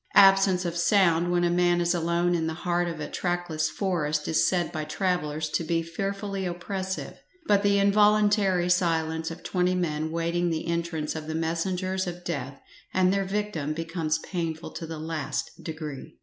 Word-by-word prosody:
Absence 195 -2 +6
of 170 -1 -2
sound 175 -2 +3
when 175 0 +2
a 175 - +2
man 175 0 +3
is 175 +1 +2
alone 170 +1 +1
in 165 -2 0
the 160 - -3
heart 175 0 +1
of 165 -2 -5
a 150 - -4
trackless 175 -3 -1
forest 155 -5 -1
is 160 - +3
said 175 -3 0
by 155 - -3
travellers 155 -2 -1
to 165 - -1
be 165 +1 0
fearfully 195 +3 -3
oppressive, 190 +2 -4 0.3
but 200 -7 +4
the 200 0 +3
involuntary 205 -2 +4
silence 160 -2 +1
of 165 - -9
twenty 180 0 +1
men 160 -3 -1
waiting 170 +1 0
the 160 -1 -2
entrance 170 -2 -2
of 155 -1 -6
the 160 - -3
messengers 185 +3 -1
of 175 0 -6
death 140 -5 -4 0.3
and 185 0 +3
their 195 0 0
victim 195 -7 -2
becomes 165 -1 -1
painful 165 -1 -4
to 165 - -6
the 160 0 -6
last 155 -2 -3
degree. 155 -4 -7
175 Hz, 175 wpm, -27 LUFS, 160-185 Hz, 0.3 s, Absence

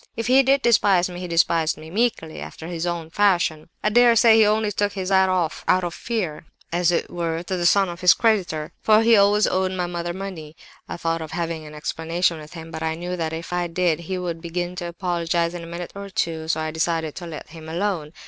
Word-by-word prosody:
If 230 - -3
he 260 +3 +6
did 270 +1 +2
despise 195 -6 +3
me, 175 - -7
he 180 - -5
despised 165 -2 +2
me 155 +1 -11
'meekly,' 205 -7 -1
after 160 - -9
his 170 0 -3
own 170 -2 -4
fashion. 175 -6 +1
"I 210 - +3
dare 240 +1 +5
say 225 0 +6
he 220 -1 +6
only 215 0 +1
took 205 0 -1
his 190 -2 -3
hat 190 0 +4
off 180 -3 -1
out 185 0 +3
of 175 -1 -3
fear, 180 -10 -4 0.3
as 175 0 +2
it 170 - -1
were, 165 -1 -2
to 185 - -3
the 175 -1 +2
son 195 +2 +4
of 175 0 -7
his 180 -2 +6
creditor; 180 -9 0
for 215 0 +5
he 230 0 +6
always 205 +1 +4
owed 185 0 0
my 180 -1 -1
mother 175 0 -4
money. 175 -5 -7 0.3
I - - -5
thought 165 -1 -1
of 160 -1 -7
having 165 -2 -3
an 150 - -11
explanation 165 +2 -1
with 155 +2 -12
him, 165 -1 -9
but 160 - -6
I 160 0 -1
knew 175 +2 -4
that 165 -2 -2
if 165 +2 -6
I 175 0 0
did, 170 -1 0
he 185 +2 -4
would 170 -2 -4
begin 175 +1 -4
to 175 - -4
apologize 170 -1 -1
in 175 - -6
a - - -9
minute 170 +1 -6
or 200 0 -8
two, 160 -4 -2
so 160 0 0
I 155 0 -2
decided 160 -1 -1
to 175 - -6
let 160 -2 -8
him 160 0 -10
alone. 170 -3 -2
175 Hz, 240 wpm, -23 LUFS, 165-190 Hz, 0.3 s, he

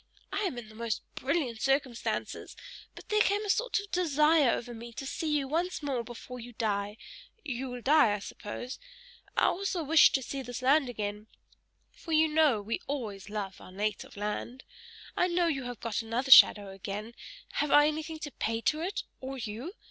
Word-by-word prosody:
I - - 0
am 310 -10 -2
in 235 -2 -7
the 215 - -14
most 230 0 -3
brilliant 260 -5 -1
circumstances, 270 -3 -1 0.4
but - - -12
there 425 0 +3
came 415 +1 +2
a 405 - +3
sort - - +1
of 405 -1 -9
desire 305 -4 +4
over 240 +1 -2
me 235 +1 -9
to 270 - -6
see 315 +3 -2
you 275 -2 -2
once 335 +3 -1
more 265 -4 -1
before 245 +2 -9
you 240 +1 -9
die; 205 -1 -2 0.5
you 260 -1 -3
will 245 -1 -7
die, 285 -7 +5
I - - -3
suppose? 210 +5 -7 0.6
I - - +4
also 385 -2 0
wished 310 +1 +6
to 265 - 0
see 270 +3 -4
this 245 0 -6
land 275 0 +4
again 210 -2 -4 0.6
for 350 -10 -7
you 315 +1 +5
know 300 -9 +3
we 225 +3 -3
always 215 -8 -4
love 200 -3 -5
our - - -12
native 205 +1 -3
land. 210 +5 -4 0.5
I 360 - +3
know 350 0 +2
you 275 -6 -1
have 245 -3 -6
got 230 -1 -2
another 235 +4 -2
shadow 205 -5 +9
again; 200 +4 -6 0.5
have 295 - 0
I 295 +1 +7
anything 310 +1 -2
to 290 - -5
pay 225 -2 -2
to 305 +6 +1
it 375 +5 -2 0.2
or 265 +1 -6
you? 240 - -6
260 Hz, 190 wpm, -30 LUFS, 225-310 Hz, 0.6 s, shadow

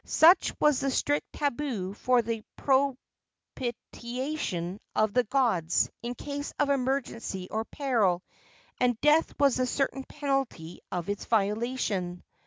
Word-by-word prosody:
Such 340 +3 +5
was 300 -3 +4
the 275 - 0
strict 290 +2 0
tabu 250 -9 -2
for 245 +3 +2
the 225 -1 -3 1.1
propitiation 240 - -4 0.2
of 215 -1 +2
the 250 -1 +3
gods 215 - +2
in 240 +1 -4
case 285 +1 -5
of 290 -1 +2
emergency 250 -8 -1
or 220 +1 -1
peril, 220 -12 +1 0.6
and 245 -2 +2
death 300 +2 +4
was 280 -3 +4
the 255 0 +1
certain 270 +1 -1
penalty 270 - -2
of 175 -2 -3
its 205 0 -3
violation. 210 -4 0
245 Hz, 125 wpm, -28 LUFS, 205-275 Hz, 1.1 s, Such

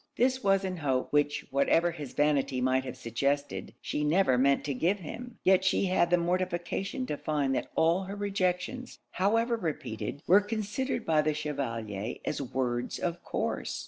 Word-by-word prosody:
This 260 +2 +2
was 195 0 +3
an 185 -1 -3
hope, 135 -5 -1
which 145 0 +2
whatever 165 +5 +3
his 150 -6 -8
vanity 140 -3 +1
might 130 +1 +1
have 130 - -6
suggested, 140 +4 -2
she 150 - -2
never 150 -2 +3
meant 140 +2 +3
to 145 - -2
give 170 +10 +1
him; 230 +7 -8
yet 190 0 +5
she 190 +1 +2
had 180 -2 +2
the 175 - +4
mortification 185 +7 -1
to 150 - -2
find 145 -2 0
that - - -2
all 170 +4 +3
her 195 +2 -6
rejections, 200 +5 -2
however 230 +5 +2
repeated, 140 - -4
were 195 +4 +6
considered 220 +4 -2
by 155 -1 +3
the 155 0 0
Chevalier 115 -8 -3
as - - -2
words 125 -2 -2
of 175 0 -3
course. - - -2
160 Hz, 170 wpm, -29 LUFS, 140-195 Hz, -, were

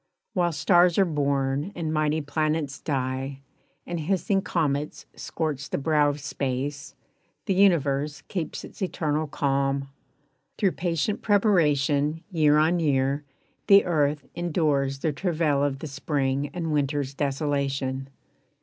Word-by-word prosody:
While 175 -4 +1
stars 175 +3 +4
are 195 - +5
born 140 0 0
and 160 -2 -2
mighty 155 0 +1
planets 150 -1 -1
die 135 -1 -3 0.4
And 175 -1 -4
hissing 190 +4 0
comets 150 -5 -2
scorch 140 0 -3
the - - -1
brow 150 0 +2
of 145 +1 -3
space 140 +1 -4 0.5
The 195 - +1
Universe 150 -7 +2
keeps 170 -6 -4
its - - -12
eternal 155 -4 -1
calm. 135 -1 0 0.7
Through 195 -3 +2
patient 170 +3 -1
preparation, 155 -7 +2
year 150 -3 +4
on 160 +3 +3
year, 140 -2 +1 0.4
The 200 0 +7
earth 150 -4 +1
endures 150 -6 0
the 150 +2 -1
travail 155 -3 0
of 140 -1 0
the 155 - -6
Spring 140 0 -1
And 165 -2 -3
Winter's 145 -1 0
desolation. 135 -2 -2
150 Hz, 125 wpm, -26 LUFS, 140-165 Hz, 0.7 s, The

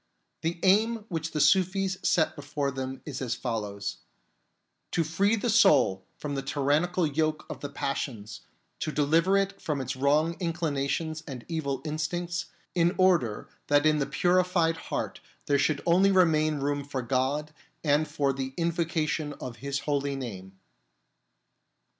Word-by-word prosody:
The 165 +1 -2
aim 215 +3 +3
which 160 -3 -2
the 155 - -3
Sufis 190 +5 +3
set 160 -3 +2
before 145 -1 -2
them 130 0 -5
is 145 -4 -5
as 120 -2 -1
follows: 105 -4 -3 1.0
To 165 - +2
free 195 +8 +2
the 225 +2 -2
soul 145 - +5
from 145 -1 -4
the 135 - -1
tyrannical 150 +6 +1
yoke 155 +1 0
of - - -7
the 145 - -5
passions, 120 -6 -4 0.4
to 155 - -2
deliver 165 +6 +3
it 195 0 -1
from 150 -3 -2
its 130 -1 -3
wrong 150 +5 +2
inclinations 160 -2 -1
and 130 -5 -7
evil 155 -5 -2
instincts, 170 +3 -2 0.3
in 175 +1 +2
order 170 - +2 0.2
that 145 +1 +4
in 155 -1 +4
the 140 - 0
purified 180 -2 +2
heart - - -3 0.3
there 140 -1 +2
should 145 0 +1
only 185 +4 +5
remain 155 -5 +3
room 145 0 -1
for 135 -2 -4
God 135 +5 -1 0.3
and 150 0 +2
for 145 -2 0
the 135 0 -5
invocation 165 -3 -1
of 125 -4 -8
His 140 +3 -3
holy 140 -1 -1
name. 95 -8 -7
150 Hz, 145 wpm, -28 LUFS, 140-170 Hz, 1.0 s, soul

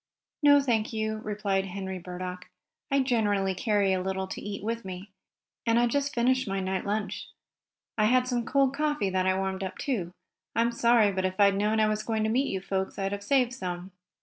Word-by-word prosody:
"No, 285 -1 +7
thank 235 -5 0
you," 220 -1 -2
replied 205 -2 -1
Henry 190 0 -5
Burdock. 180 +1 -7 0.4
"I 275 -1 +3
generally 205 -7 +1
carry 200 0 +1
a 185 - 0
little 190 0 -2
to - - -6
eat 200 -1 -6
with 230 +2 -2
me, 190 +1 -8 0.5
and 230 0 +2
I 240 - +4
just 280 +4 -1
finished 255 +1 +2
my 195 0 -1
night 190 +1 -2
lunch. 210 +1 -2 0.7
I 215 - +5
had 250 +3 +3
some 245 -2 0
cold 275 +2 +2
coffee 295 -9 0
that 185 0 +1
I 190 0 +2
warmed 190 0 -2
up, 185 0 -5
too. 200 -11 -2 0.4
I'm 235 +1 +2
sorry, 235 -3 +4
but 190 -1 -2
if 185 +1 -2
I 200 - +7
had 200 0 +4
known 210 +2 +1
I 215 - +5
was 215 0 0
going 220 -1 -1
to 220 - +1
meet 265 +4 +2
you 190 - -2
folks 190 0 -3
I'd 195 0 -1
have 200 0 -3
saved 250 +1 +2
some." 180 -3 -5
210 Hz, 210 wpm, -28 LUFS, 190-235 Hz, 0.7 s, No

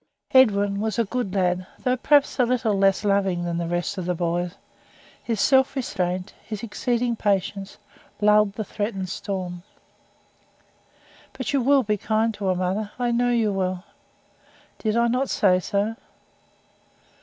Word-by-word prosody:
Edwin 205 -6 +4
was 215 -1 -2
a 230 - +2
good 205 -3 -3
lad, 180 -1 0 0.2
though 250 0 +2
perhaps 285 +2 +2
a - - +6
little 240 -3 +1
less 195 +1 +2
loving 195 -3 +1
than 170 0 -2
the 170 - -2
rest 175 +3 -2
of 180 - -4
the 180 - 0
boys. 175 +1 -2 0.7
His 225 -3 -2
self 265 +2 +3
restraint, 185 -8 -2
his 215 0 -6
exceeding 240 +1 -1
patience, 200 -1 -1 0.4
lulled 210 -1 +4
the 215 - -4
threatened 205 -3 -4
storm. 185 -2 -4 1.7
"But 260 -3 -4
you 275 - +2
will 275 +2 +4
be 210 -1 0
kind 220 +2 0
to 205 -1 -6
her, 185 -1 +2
mother? 190 +4 -2
I 245 -1 0
know 245 +1 +2
you 225 -4 +1
will." 185 -1 -2 1.0
"Did 220 0 0
I 235 0 +3
not 255 +3 0
say 185 -3 +3
so?" 205 +4 -1
205 Hz, 155 wpm, -24 LUFS, 185-235 Hz, 1.7 s, a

